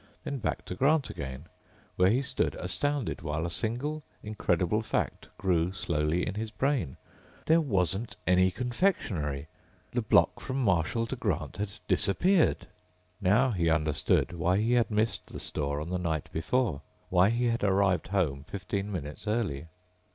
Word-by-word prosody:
Then 140 - -3
back 110 - -2
to - - -5
Grant 140 +7 +2
again, 65 +2 -6 0.5
where 90 +1 +4
he 125 +6 +2
stood - - -1
astounded 130 +10 -2
while 75 +1 -2
a 85 - -3
single, 130 - -2 0.2
incredible 105 -1 0
fact 110 - -2
grew 90 -2 +1
slowly 85 -2 0
in 95 - -3
his 110 +2 -3
brain: 120 - -1 0.5
There 165 +1 +5
wasn't 105 - 0
any 90 +1 +4
confectionery! 95 - -1 0.4
The - - 0
block - - +3
from 130 - -4
Marshall 100 +3 +2
to 125 - -4
Grant 90 - -2
had 105 0 -4
disappeared! 175 - +3 0.6
Now 105 +8 +4
he 85 -5 +1
understood 75 +1 +1
why 90 +2 +1
he 115 +4 +2
had 120 -2 +3
missed 110 +1 0
the - - -5
store 70 -1 -2
on 80 +4 -5
the 90 - 0
night 80 -4 -2
before, 90 - 0 0.3
why 90 +2 +5
he 120 +2 +1
had 115 -1 -1
arrived 95 -2 +2
home 85 -8 0
fifteen 100 +5 -4
minutes 75 -1 -6
early. 100 -10 -1
95 Hz, 155 wpm, -29 LUFS, 85-115 Hz, 0.6 s, There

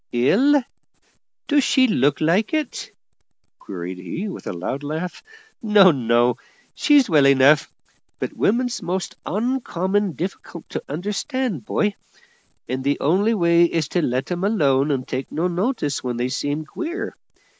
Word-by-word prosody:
"Ill? 235 - +4 0.9
do 290 -1 +3
she 260 0 +3
look 145 - +2
like 185 - +1
it?" 305 -4 -3 0.7
queried 90 -1 -7
he 165 - -5
with 195 - -8
a - - -2
loud 90 +10 -4
laugh. 160 +5 -5 0.4
"No, 210 -4 +6
no, 120 -2 +2 0.4
she's 290 -4 +4
well 150 -5 +4
enough; 140 +2 +5 0.5
but - - -4
women's 245 +3 0
most 185 +1 -3
oncommon 205 -4 -1
difficult 170 +1 -6
to - - -4
understand, 205 - -3
boy; 210 -1 0 0.7
and 130 +2 -3
the 140 +1 0
only 200 +9 +2
way 170 -3 +4
is 165 -3 -1
to 175 - 0
let 130 +2 -2
'em 175 +1 -2
alone 145 -9 +2
and 130 -3 -1
take 130 +1 -4
no 170 +3 0
notice 180 - -2
when 125 -2 -3
they 125 +1 -1
seems 145 +3 -2
queer. 345 - -5
170 Hz, 145 wpm, -22 LUFS, 135-210 Hz, 0.9 s, No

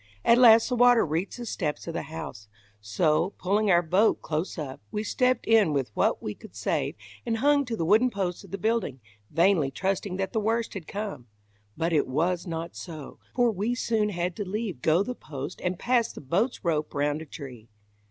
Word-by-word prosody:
At 235 +1 +6
last 230 -2 +7
the 250 - -1
water 245 -1 +5
reached 165 +8 -2
the 240 - -6
steps 155 -8 -3
of 165 - -5
the 170 - -2
house; 155 -10 -8 0.3
so, 155 - +1
pulling 205 +3 +1
our 175 -2 +5
boat 190 +7 +3
close 160 +5 -3
up, 140 -4 -6
we 210 - -2
stepped 250 +3 +1
in 215 -8 +4
with 135 -6 -1
what - - +1
we 105 - -3
could - - -15
save - - -1 0.3
and 225 - -1
hung 285 +3 +3
to 240 -2 -3
the 165 - -1
wooden 220 +8 +4
posts 190 -5 -3
of - - -14
the 195 - -4
building, 215 - -1 0.3
vainly 165 -3 +3
trusting 190 +5 -2
that 190 -1 -3
the 220 - +1
worst 225 +2 0
had 185 -6 -7
come; 200 - -5 0.5
but 165 +1 0
it 150 - +2
was 170 +7 0
not 165 0 -5
so, 155 -5 -9 0.2
for 245 -2 +3
we 215 +4 -1
soon 220 -3 0
had 175 -2 -2
to 205 - -2
leave 200 - -4
go 165 +4 +3
the 250 - -4
post 145 - -7
and 180 0 -1
pass 240 +1 +1
the - - -10
boat's 190 - -1
rope 155 -3 -1
round 145 +2 0
a - - -7
tree. 125 -8 -10
185 Hz, 205 wpm, -27 LUFS, 155-220 Hz, 0.5 s, last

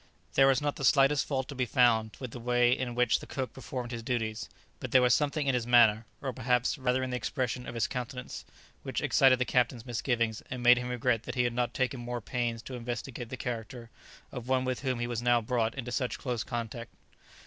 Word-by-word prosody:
There 135 - +5
was 135 0 +3
not 145 -1 -1
the - - -6
slightest 135 +1 +4
fault 135 -2 -1
to - - -5
be 130 -2 -1
found 115 -4 +3
with 125 -3 -6
the 120 - -8
way 120 0 +3
in 125 -3 -4
which 125 -1 +3
the - - -11
cook 130 -2 -4
performed 125 -2 -6
his 120 -1 -4
duties, 115 -2 -3 0.3
but - - -5
there 130 - +5
was 125 -2 +5
something 150 0 +1
in 135 - +2
his 120 -2 -1
manner, 115 -2 +5 0.2
or 135 -2 -2
perhaps, 125 +1 +1
rather 130 0 +1
in 130 - -3
the - - -1
expression 125 0 -3
of - - -6
his 115 - +1
countenance, 125 0 -5 0.4
which - - -3
excited 130 -1 +5
the 125 - 0
Captain's 125 -1 0
misgivings, 115 -2 -1
and 125 -1 -5
made 125 0 +7
him 125 0 -4
regret 125 -2 0
that - - -5
he 125 - +2
had 120 -1 0
not 120 0 -1
taken 130 0 -1
more 120 0 -4
pains 115 0 -3
to 130 - -8
investigate 120 0 -5
the 130 - -6
character 115 -1 -6 0.4
of 125 -1 -7
one 130 0 +1
with 130 -1 -1
whom 130 -2 -1
he 120 - -1
was 120 -1 -3
now 120 0 +4
brought 115 0 -1
into 125 -2 -5
such 125 +1 -1
close 125 -4 -3
contact. 115 -1 -5
125 Hz, 230 wpm, -30 LUFS, 120-130 Hz, 0.4 s, made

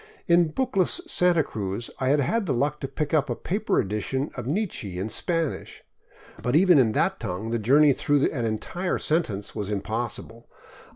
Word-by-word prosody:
In 170 -1 +5
bookless 225 -5 +1
Santa 175 -3 +3
Cruz 100 -1 -4
I 130 - 0
had 145 +2 +3
had 205 - 0
the - - +1
luck 145 +4 0
to 135 - -4
pick 145 +2 -4
up 150 -3 +2
a 120 - -1
paper 205 - -1
edition 105 +8 -2
of - - -6
Nietzsche 145 - -2
in 95 +4 -3
Spanish, 165 +5 -3 0.6
but 125 +3 0
even 175 -2 +6
in 115 -4 +3
that - - +1
tongue 100 +6 -4
the 115 - 0
journey 140 +6 +5
through 145 +1 +2
an 125 -5 -3
entire 145 - -2
sentence 115 - -1
was 105 -2 -4
impossible. 115 +3 -4
135 Hz, 175 wpm, -25 LUFS, 110-165 Hz, 0.6 s, even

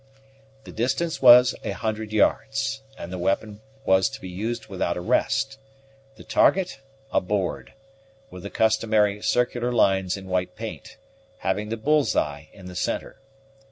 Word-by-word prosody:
The - - -11
distance 135 +8 -1
was 125 0 +8
a - - -3
hundred 110 -1 -3
yards, 135 +5 +1 0.2
and 85 - -7
the 90 - -4
weapon 105 +3 -1 0.2
was 95 0 +4
to - - -9
be 95 - -8
used 110 +6 -4
without - - -2
a - - -2
rest; 135 0 0 0.6
the - - -13
target, 175 -8 +2 0.3
a - - +2
board, 95 -1 -3 0.6
with 90 - -9
the 100 - -6
customary 110 -2 +2
circular 120 +1 0
lines 95 -5 +2
in 95 - -10
white 90 -1 -2
paint, 110 -9 -8 0.5
having 105 +3 -1
the 115 - -3
bull's 150 +5 +2
eye 75 +1 -2
in 95 - -14
the 90 0 -9
centre. - - -3
110 Hz, 155 wpm, -24 LUFS, 95-125 Hz, 0.6 s, was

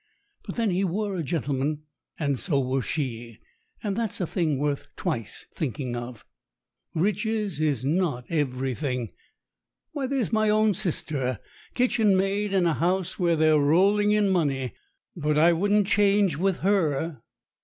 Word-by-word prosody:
But - - -5
then 230 -4 +1
he 185 +2 +1
were 200 +2 -1
a 175 - -2
gentleman, 145 -1 -2 0.3
and 140 -5 -1
so 145 -7 0
were 130 0 0
she, 120 -5 -4 0.5
and 205 -3 -1
that's 225 -2 -2
a 180 - 0
thing 160 -5 0
worth 145 0 -2
twice 115 -4 -4
thinking 130 -4 -3
of. 120 -2 -7 0.7
Riches 210 +1 0
is 145 -5 0
not 150 -5 0
everything. 130 - -2 0.8
Why, 280 -3 -3
there's 255 -5 -1
my 215 -1 +3
own 215 0 +3
sister, 145 - -2 0.4
kitchen 225 -6 +3
maid 200 +2 0
in 190 -3 +2
a 165 - +3
house 180 +3 -1
where 170 -2 +3
they're 155 -1 +4
rolling 195 +8 +3
in 210 -1 +3
money, 140 -8 0 0.4
but 150 -3 0
I 170 +3 +6
wouldn't 205 +4 +2
change 200 -4 +3
with 190 +3 0
her. 165 - 0
170 Hz, 145 wpm, -26 LUFS, 140-200 Hz, 0.8 s, I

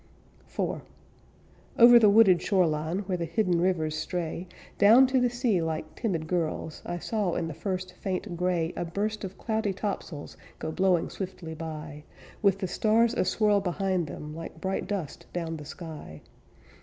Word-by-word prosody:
IV - - -2 1.0
Over 240 0 +9
the 215 -3 +6
wooded 200 -4 +6
shore 190 -3 +3
line, 155 +4 -1
Where 180 -2 -2
the 170 - -1
hidden 180 -3 +1
rivers 165 -4 +1
stray 170 +2 -3 0.3
Down 230 +6 +8
to 260 0 +2
the 245 - +3
sea 240 -6 +1
like 155 -1 -3
timid 180 -9 -2
girls, 160 -2 -2
I 175 - -2
saw 200 -1 -1
in 165 - -1
the 165 - -5
first 185 +3 -4
faint 190 -1 -4
gray 175 -1 0
A - - -2
burst 210 +6 -3
of 195 0 -6
cloudy 220 -3 -1
topsails 185 -6 -5 0.2
Go 160 - -4
blowing 185 0 +1
swiftly 180 -4 -6
by, 155 -2 -7 0.4
With 200 -3 +4
the 195 -2 -3
stars 225 +5 +2
aswirl 205 +2 +2
behind 185 -2 0
them 150 +1 -7
Like 165 0 -8
bright 190 +3 -2
dust 190 -8 -4
down 165 -2 -3
the 150 - -9
sky. 150 - -9
180 Hz, 165 wpm, -28 LUFS, 160-205 Hz, 1.0 s, Over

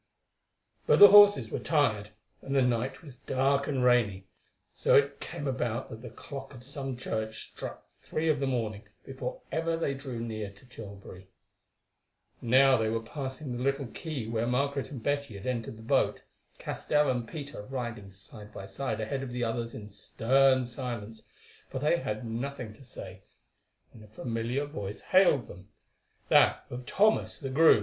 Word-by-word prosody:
But - - +6
the 205 0 +11
horses 205 0 +8
were - - -2
tired, 110 -10 +1 0.3
and 135 - -3
the 135 - +5
night 125 +3 -1
was 140 -6 -11
dark 135 +1 +1
and 135 -4 0
rainy, 110 -6 +3 0.5
so - - +3
it 140 0 +3
came 160 -4 -5
about 120 -3 -2
that 110 - -8
the 125 - -8
clock 135 +3 -9
of 120 - -12
some 135 -1 -5
church 110 -3 -4
struck - - -8
three 160 +1 -2
of 155 -3 +2
the 135 - 0
morning 110 -4 -2 0.2
before 135 0 -6
ever 165 +2 0
they 155 -4 -1
drew 135 -3 -6
near 110 -3 -4
to 100 +6 -18
Tilbury. 100 -5 -11 1.1
Now 130 +2 +5
they 110 -1 0
were 115 0 -1
passing 130 +3 -5
the 120 - -4
little 140 +1 0
quay 140 0 -5
where 115 +1 -1
Margaret 140 +2 0
and 130 -6 -8
Betty 140 -6 -1
had 100 - -10
entered 115 -3 -3
the 110 - -12
boat, 115 - +1 0.3
Castell 150 0 0
and 120 -2 -2
Peter 145 -5 -7
riding 120 -5 -5
side 105 +2 -13
by 95 - -8
side 110 +1 -3
ahead 120 +5 -2
of 135 - -5
the 125 0 -3
others 115 0 -2
in 105 -1 -9
stern 130 +5 +3
silence, 120 -3 -6 0.5
for - - -5
they 150 +5 +2
had 110 -6 -4
nothing 120 0 -4
to 125 - -16
say, 95 -6 -9 0.7
when 110 - -14
a - - -14
familiar 115 +5 -2
voice 105 -9 -6
hailed 185 -9 +4
them—that 95 +4 0
of 125 0 -7
Thomas 215 +2 +2
the 135 -3 -5
groom. 155 -3 +6
125 Hz, 170 wpm, -29 LUFS, 110-140 Hz, 1.1 s, the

